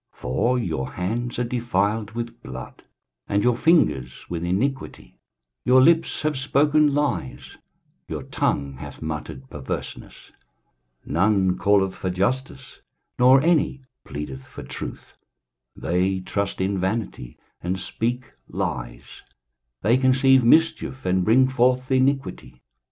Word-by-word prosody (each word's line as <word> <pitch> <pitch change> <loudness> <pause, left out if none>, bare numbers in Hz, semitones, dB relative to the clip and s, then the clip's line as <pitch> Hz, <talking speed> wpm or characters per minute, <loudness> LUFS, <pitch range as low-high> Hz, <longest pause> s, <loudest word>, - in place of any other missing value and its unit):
23:059:003 - - -26
For 115 - +1
your 80 - -3
hands 115 +7 -3
are 125 - 0
defiled 110 -3 -1
with 115 0 -6
blood, 65 0 -9 0.4
and 100 0 +1
your 125 -1 +3
fingers 70 - +2
with 85 -1 -3
iniquity; 120 +10 -3 0.4
your 130 +1 +5
lips 165 +5 +3
have 155 -1 0
spoken 145 +2 +3
lies, 105 - -2 0.5
your - - -5
tongue 70 -2 -1
hath - - -9
muttered 75 -3 -6
perverseness. 70 -3 -7 0.7
23:059:004 - - -6
None 95 +1 +2
calleth 100 -2 +2
for 95 - -3
justice, 130 +8 -3 0.4
nor 130 +2 +6
any 155 -5 +1 0.2
pleadeth 70 -3 -7
for - - -10
truth: - - -8 0.6
they 90 +3 0
trust 100 +2 -3
in 95 +1 0
vanity, 95 - -3 0.2
and 90 +2 -2
speak 120 +6 -2 0.2
lies; - - -5 0.6
they 115 +6 +4
conceive 130 0 +4
mischief, 160 0 +2
and 90 0 +2
bring 125 +6 +5
forth 130 0 +1
iniquity. 130 - 0
110 Hz, 125 wpm, -23 LUFS, 90-130 Hz, 0.7 s, nor